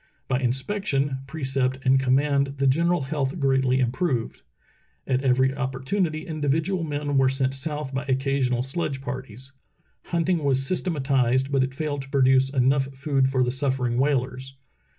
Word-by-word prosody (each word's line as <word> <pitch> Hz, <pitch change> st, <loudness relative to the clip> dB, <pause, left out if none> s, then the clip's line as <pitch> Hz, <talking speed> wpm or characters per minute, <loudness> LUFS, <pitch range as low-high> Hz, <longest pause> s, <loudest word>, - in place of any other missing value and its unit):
By 125 Hz, -1 st, 0 dB
inspection, 135 Hz, +1 st, -1 dB
precept, 135 Hz, -3 st, -1 dB
and 130 Hz, +1 st, +5 dB
command 140 Hz, +1 st, +1 dB
the 135 Hz, -, 0 dB
general 170 Hz, +6 st, +2 dB
health 140 Hz, +1 st, -2 dB
greatly 135 Hz, -2 st, +2 dB
im 125 Hz, -2 st, +1 dB
proved. 130 Hz, -6 st, -2 dB, 0.6 s
At 130 Hz, -1 st, 0 dB
every 130 Hz, 0 st, +2 dB
opportunity 145 Hz, +5 st, -2 dB
individual 160 Hz, +3 st, -1 dB
men 145 Hz, -2 st, -1 dB
were 130 Hz, -1 st, +4 dB
sent 135 Hz, 0 st, 0 dB
south 145 Hz, 0 st, -4 dB
by 135 Hz, +2 st, -2 dB
occasional 130 Hz, -2 st, 0 dB
sledge 135 Hz, 0 st, -3 dB
parties. 130 Hz, -1 st, -7 dB, 0.5 s
Hunting 170 Hz, 0 st, 0 dB
was 135 Hz, -1 st, +2 dB
systematized, 135 Hz, -6 st, +1 dB
but 135 Hz, -2 st, +3 dB
it 130 Hz, 0 st, -4 dB
failed 145 Hz, -1 st, -3 dB
to 135 Hz, -, -11 dB
produce 135 Hz, -1 st, +3 dB
enough 135 Hz, 0 st, +2 dB
food 135 Hz, -1 st, +1 dB
for 130 Hz, -1 st, +1 dB
the 125 Hz, -, 0 dB
suffering 130 Hz, -2 st, -1 dB
whalers. 135 Hz, -1 st, -1 dB
135 Hz, 150 wpm, -24 LUFS, 130-145 Hz, 0.6 s, and